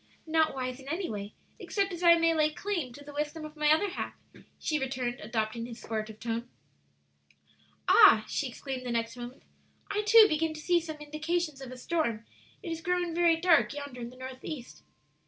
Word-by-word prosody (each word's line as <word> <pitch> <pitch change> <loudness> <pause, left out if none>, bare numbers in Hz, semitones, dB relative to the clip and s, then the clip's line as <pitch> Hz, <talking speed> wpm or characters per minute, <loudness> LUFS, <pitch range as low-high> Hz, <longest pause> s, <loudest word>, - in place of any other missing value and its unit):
"Not 320 -2 +2
wise 255 0 -3
in 270 - -13
any 345 0 -2
way 205 0 -6 0.2
except 395 -2 -1
as 345 - -6
I 340 -1 +8
may 330 0 +3
lay 305 -1 +3
claim 340 -6 -3
to 285 +3 -12
the 290 - -10
wisdom 300 +2 -3
of 305 0 -10
my 300 0 +3
other 355 +6 +3
half," - - -5 0.4
she 305 -1 -1
returned, 255 -2 -2
adopting 220 +1 -2
his 235 -1 -9
sportive 220 -1 -5
tone. 235 +1 -3 1.4
"Ah," 380 - +7
she 285 - -1
exclaimed 255 +1 -6
the 250 - -5
next 230 0 -1
moment, 245 +2 -9 0.5
"I, 415 - +1
too, 435 +1 +8
begin 315 -1 0
to - - -7
see 350 +2 +3
some 315 -2 -7
indications 305 0 -2
of 260 -2 -8
a 255 - -8
storm; 245 -6 -1 0.4
it 345 - -4
is 330 0 -4
growing 355 0 0
very 340 -1 +4
dark 330 -4 +3
yonder 285 -4 -7
in 235 - -5
the 255 - -15
northeast!" 260 +1 -8
295 Hz, 190 wpm, -30 LUFS, 245-330 Hz, 1.4 s, I